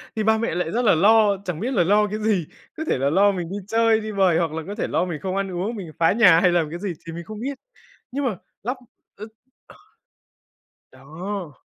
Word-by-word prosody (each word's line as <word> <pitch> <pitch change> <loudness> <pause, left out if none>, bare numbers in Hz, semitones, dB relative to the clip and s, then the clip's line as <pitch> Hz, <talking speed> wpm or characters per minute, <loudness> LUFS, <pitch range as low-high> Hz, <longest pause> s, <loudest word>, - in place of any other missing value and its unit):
Thì 220 - -1
ba 220 +1 +3
mẹ 230 -5 -2
lại 175 -2 -2
rất 240 - 0
là 200 - +5
lo, 205 +3 +4
chẳng 175 -3 -4
biết 250 +4 -2
là 180 - +3
lo 210 +4 +3
cái 210 +2 -4
gì, 210 -7 0 0.3
có 315 - -3
thể - - +1
là 135 +2 +1
lo 200 +5 +4
mình 175 -3 -4
đi 195 - -4
chơi, 225 0 +3
đi 215 0 -5
bời 190 -5 +3
hoặc 165 -2 0
là 160 0 -4
có 205 - -5
thể 220 - -2
lo - - 0
mình 170 -4 -5
không 190 0 -3
ăn 195 -1 -2
uống, 190 +6 -3
mình 185 -7 -7
phá 165 - +4
nhà 200 -8 +6
hay 180 0 +4
làm 170 -3 +1
cái 170 +3 -6
gì 195 -2 -3
thì 165 - -7
mình 170 - -6
không 215 +4 -9
biết. 270 +4 -4 0.5
Nhưng 280 +2 -3
mà 230 -7 -1 0.3
lắp, 250 +5 -2 0.4
ơ, 210 - -7 1.7
ờ 130 - -19
đó. 160 - -7
195 Hz, 245 wpm, -23 LUFS, 170-215 Hz, 1.7 s, nhà